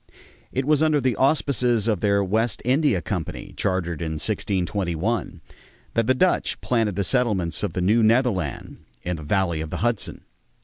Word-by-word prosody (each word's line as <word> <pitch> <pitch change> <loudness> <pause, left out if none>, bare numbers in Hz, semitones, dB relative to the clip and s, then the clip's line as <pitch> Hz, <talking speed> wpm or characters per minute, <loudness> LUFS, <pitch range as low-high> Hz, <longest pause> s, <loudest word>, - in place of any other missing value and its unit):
It 130 +1 -1
was 150 0 +3
under 155 -2 +3
the 130 -3 +1
auspices 125 -4 +2
of 105 -5 +1
their 100 +1 +2
West 110 +3 0
India 130 - +2
Company, - - -5
chartered 85 -4 -2
in 80 -1 -2
1621, 95 +1 -2 0.5
that 115 -1 +1
the 130 - +4
Dutch 185 +7 +1
planted 115 -5 0
the 100 - 0
settlements 100 -7 0
of 100 -5 -2
the 90 - -2
New 105 +6 +3
Netherland 110 - +1 0.3
in 90 -1 -2
the - - -8
valley 85 0 0
of 80 - -5
the - - -4
Hudson. 120 -4 -1
105 Hz, 165 wpm, -23 LUFS, 90-125 Hz, 0.5 s, the